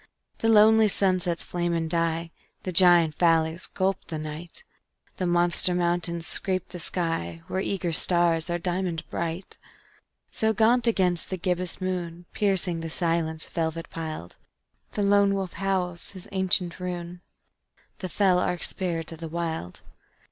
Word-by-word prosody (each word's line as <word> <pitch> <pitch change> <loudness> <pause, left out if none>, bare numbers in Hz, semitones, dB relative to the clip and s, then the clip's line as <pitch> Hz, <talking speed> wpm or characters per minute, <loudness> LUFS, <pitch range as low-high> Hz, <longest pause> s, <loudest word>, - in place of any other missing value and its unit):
_The 225 - +1
lonely 220 0 +6
sunsets 185 -4 0
flame 175 -1 -1
and 165 -1 -1
die; 165 0 -1 0.3
The 185 - -3
giant 175 -3 +6
valleys 165 0 +2
gulp 190 0 -1
the 160 - -4
night; 155 +2 -4 0.5
The 185 - -1
monster 175 +1 +3
mountains 170 -1 0
scrape 185 0 -2
the 180 - -8
sky, 165 - -2
Where 190 - -2
eager 185 -3 -2
stars 170 0 +2
are 175 - 0
diamond 175 -1 -2
bright._ 170 +2 -3 0.7
So 220 0 +1
gaunt 235 +3 +3
against 180 -6 +1
the 185 - -3
gibbous 180 0 -2
moon, 175 -2 -4
Piercing 190 -4 +1
the 165 0 -5
silence 165 -1 -1
velvet 165 0 -3
piled, 155 - -6 0.6
A 205 - +1
lone 200 0 +4
wolf 190 -2 -3
howls 185 -3 -2
his 185 -2 -11
ancient 185 -2 +2
rune 175 -1 -5 0.8
The 185 - -5
fell 185 0 +3
arch 180 -1 -1
spirit 170 -4 -3
of 165 - -9
the 165 - -5
Wild. 160 - -4
175 Hz, 145 wpm, -26 LUFS, 165-185 Hz, 0.8 s, lonely